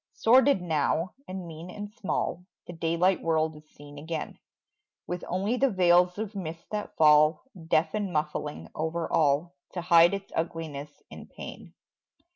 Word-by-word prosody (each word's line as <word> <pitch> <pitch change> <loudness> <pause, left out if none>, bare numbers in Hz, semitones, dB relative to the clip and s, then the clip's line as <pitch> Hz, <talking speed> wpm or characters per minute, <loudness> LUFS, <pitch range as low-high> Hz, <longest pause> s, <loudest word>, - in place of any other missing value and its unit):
Sordid 255 -3 +4
now, 165 +2 0 0.2
and 185 -1 -6
mean 165 +1 -9
and 205 +2 -7
small 190 -4 -2 0.2
The 175 - -8
daylight 170 +3 +1
world 160 -1 0
is 155 0 -16
seen 145 0 -12
again, 160 +1 -5 0.7
With 175 0 -5
only 200 +7 -1
the 275 +1 +3
veils 180 -2 +4
of 215 0 -4
mist 170 -4 -6
that 210 -1 -5
fall 150 0 +5 0.2
Deaf 155 0 +2
and 205 -3 -2
muffling 150 - -3
over 160 +1 -2
all 155 +3 +2 0.2
To 175 - -3
hide 170 +1 +6
its 195 0 -8
ugliness 155 -3 -4
and - - -11
pain. - - -10
170 Hz, 150 wpm, -28 LUFS, 155-185 Hz, 0.7 s, hide